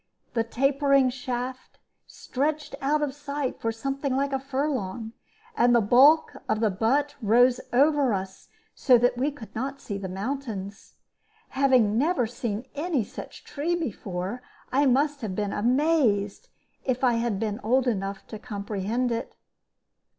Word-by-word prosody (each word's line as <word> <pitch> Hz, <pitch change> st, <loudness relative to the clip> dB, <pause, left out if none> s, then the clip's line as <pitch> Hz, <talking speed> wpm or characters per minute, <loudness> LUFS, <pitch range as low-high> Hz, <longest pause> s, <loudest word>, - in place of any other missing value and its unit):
The 230 Hz, -, +1 dB
tapering 275 Hz, +2 st, +2 dB
shaft 255 Hz, 0 st, -5 dB, 0.3 s
stretched 295 Hz, +3 st, -3 dB
out 300 Hz, +2 st, +1 dB
of 280 Hz, -2 st, -2 dB
sight 285 Hz, -2 st, -4 dB
for 225 Hz, -, 0 dB
something 275 Hz, +3 st, -2 dB
like 275 Hz, +1 st, 0 dB
a 270 Hz, -, +1 dB
furlong, 260 Hz, -6 st, -3 dB, 0.4 s
and 245 Hz, -, +4 dB
the -, -, +6 dB
bulk 265 Hz, +9 st, +5 dB, 0.2 s
of 215 Hz, -, +1 dB
the 220 Hz, -2 st, +2 dB
butt 270 Hz, +9 st, +1 dB
rose 245 Hz, +3 st, +4 dB
over 280 Hz, 0 st, +3 dB
us 190 Hz, -1 st, -5 dB, 0.2 s
so 255 Hz, -3 st, +5 dB
that 245 Hz, +1 st, +2 dB
we 260 Hz, +4 st, 0 dB
could 270 Hz, -7 st, -11 dB
not 270 Hz, +4 st, -4 dB
see 200 Hz, -2 st, -5 dB
the 190 Hz, -1 st, -5 dB
mountains. 200 Hz, -1 st, -5 dB, 0.5 s
Having 255 Hz, -6 st, +3 dB
never 290 Hz, -3 st, +2 dB
seen 230 Hz, 0 st, -4 dB
any 300 Hz, -4 st, -1 dB
such -, -, -10 dB
tree 320 Hz, +5 st, -2 dB
before, 205 Hz, -, -4 dB, 0.3 s
I 280 Hz, +2 st, +3 dB
must 285 Hz, +3 st, +2 dB
have 205 Hz, -5 st, -4 dB
been 205 Hz, 0 st, -2 dB
amazed 240 Hz, -4 st, +1 dB, 0.3 s
if 255 Hz, 0 st, -1 dB
I 245 Hz, -2 st, +4 dB
had 230 Hz, -5 st, -1 dB
been 215 Hz, -1 st, -2 dB
old 255 Hz, +4 st, +2 dB
enough 195 Hz, -3 st, -2 dB
to 215 Hz, -, -7 dB
comprehend 210 Hz, +2 st, -2 dB
it. 230 Hz, -, -4 dB
250 Hz, 150 wpm, -26 LUFS, 220-275 Hz, 0.5 s, the